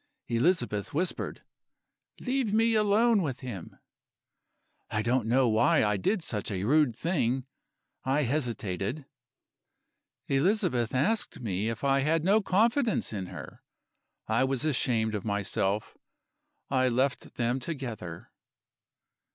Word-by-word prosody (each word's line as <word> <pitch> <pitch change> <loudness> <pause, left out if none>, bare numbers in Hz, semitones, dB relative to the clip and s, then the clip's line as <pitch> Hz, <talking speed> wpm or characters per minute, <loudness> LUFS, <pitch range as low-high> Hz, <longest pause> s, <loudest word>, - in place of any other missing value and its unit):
"Elizabeth 120 - +1
whispered: 180 +4 -2 0.8
'Leave 255 -4 -1
me 225 +2 +3
alone 215 +1 +3
with 140 -6 -3
him.' 115 -10 -7 1.1
"I 110 -1 -1
don't 120 0 +1
know 125 +2 +3
why 115 +8 +3
I 105 -1 +1
did 185 - 0
such 105 -8 -3
a 95 -3 -3
rude 140 0 +3
thing 130 -6 0 0.6
I 135 +3 +1
hesitated. 120 - -2 1.2
"Elizabeth 140 - +1
asked 200 - 0
me 105 -2 -2
if 115 +2 -5
I 135 0 +3
had 155 +3 +1
no 200 +5 +4
confidence 225 - +1
in 95 -3 -4
her. - - -10 0.7
I 115 +3 +2
was 135 +2 -1
ashamed 120 -6 +1
of 105 -3 -3
myself; 100 0 -1 0.7
I 130 -1 +3
left 130 +3 -1
them 120 +2 0
together. 120 - -6
130 Hz, 120 wpm, -29 LUFS, 110-170 Hz, 1.2 s, no